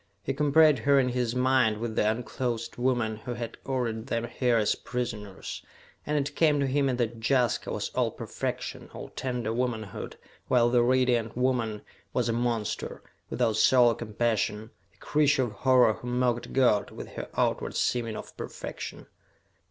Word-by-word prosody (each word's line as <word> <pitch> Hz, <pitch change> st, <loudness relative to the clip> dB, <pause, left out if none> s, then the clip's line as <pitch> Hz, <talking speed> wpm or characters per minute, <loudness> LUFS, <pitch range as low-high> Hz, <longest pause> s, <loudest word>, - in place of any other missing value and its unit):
He 135 Hz, -, -1 dB
compared 150 Hz, +1 st, +5 dB
her 140 Hz, -1 st, +4 dB
in 125 Hz, -1 st, +2 dB
his 125 Hz, -1 st, -1 dB
mind 125 Hz, -4 st, +3 dB
with 110 Hz, 0 st, -4 dB
the 105 Hz, -, +3 dB
unclothed 115 Hz, +1 st, -3 dB
woman 120 Hz, -3 st, 0 dB
who 120 Hz, +2 st, -6 dB
had 115 Hz, -1 st, -6 dB
ordered 120 Hz, -4 st, -2 dB
them 115 Hz, -2 st, -1 dB
here 120 Hz, 0 st, +1 dB
as 105 Hz, -2 st, +2 dB
prisoners, 105 Hz, -6 st, -5 dB, 0.4 s
and 150 Hz, 0 st, +1 dB
it 145 Hz, 0 st, -2 dB
came 150 Hz, -3 st, +3 dB
to 140 Hz, -, +2 dB
him 135 Hz, +1 st, +1 dB
that 120 Hz, -1 st, -1 dB
Jaska 125 Hz, -4 st, +2 dB
was -, -, -2 dB
all -, -, 0 dB
perfection, -, -, -5 dB
all -, -, -7 dB
tender 125 Hz, -4 st, -3 dB
womanhood, 115 Hz, -4 st, -3 dB, 0.3 s
while 120 Hz, -1 st, +3 dB
the 120 Hz, -1 st, +4 dB
Radiant 120 Hz, -2 st, +2 dB
Woman 120 Hz, -4 st, 0 dB, 0.3 s
was -, -, +1 dB
a 115 Hz, -, +1 dB
monster, 115 Hz, -2 st, -2 dB, 0.3 s
without 115 Hz, -3 st, +1 dB
soul 125 Hz, 0 st, +6 dB
or 115 Hz, -, 0 dB
compassion 110 Hz, -1 st, -1 dB, 0.2 s
a -, -, -31 dB
creature 150 Hz, -2 st, +2 dB
of 120 Hz, -, -3 dB
horror 125 Hz, -2 st, +4 dB
who 120 Hz, -, -9 dB
mocked 125 Hz, -1 st, 0 dB
God 125 Hz, -6 st, +3 dB
with -, -, -9 dB
her -, -, -7 dB
outward -, -, 0 dB
seeming 115 Hz, -3 st, 0 dB
of -, -, -9 dB
perfection. -, -, -7 dB
120 Hz, 165 wpm, -28 LUFS, 115-130 Hz, 0.4 s, soul